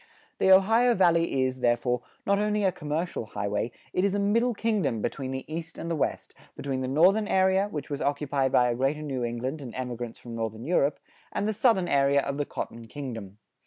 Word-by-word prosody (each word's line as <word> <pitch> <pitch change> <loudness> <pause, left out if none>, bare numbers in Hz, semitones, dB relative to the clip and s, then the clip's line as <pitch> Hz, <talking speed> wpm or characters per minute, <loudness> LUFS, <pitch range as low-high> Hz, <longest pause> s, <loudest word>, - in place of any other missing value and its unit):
The - - +3
Ohio 225 +6 +5
Valley 170 -7 +3
is, 130 0 -3
therefore, 125 0 +1 0.2
not 200 0 +2
only 210 0 +1
a 190 - +3
commercial 150 -5 -3
highway, 105 +2 -2 0.2
it 180 - +1
is 200 0 +2
a - - +1
middle 230 +4 +2
kingdom 210 - 0
between 130 +4 -3
the 130 0 -4
East 165 +1 -6
and 170 - -4
the - - +1
West, 150 - -2 0.2
between 135 -2 -3
the 130 - -2
northern 185 +10 +4
area, 190 +1 +3
which 150 -5 -6
was 140 - -3
occupied 140 -2 0
by 125 -1 +4
a - - -1
greater 135 +5 0
New 135 -4 -3
England 125 +5 -3
and 125 -4 -8
emigrants 120 -2 -5
from 120 - -10
northern 115 0 -4
Europe, 150 -3 +2 0.3
and 205 - -1
the 215 - 0
southern 210 -4 +3
area 140 0 +3
of 140 0 -3
the 145 - -1
"Cotton 115 -3 -6
Kingdom." 115 -8 -7
145 Hz, 200 wpm, -27 LUFS, 125-190 Hz, 0.3 s, Ohio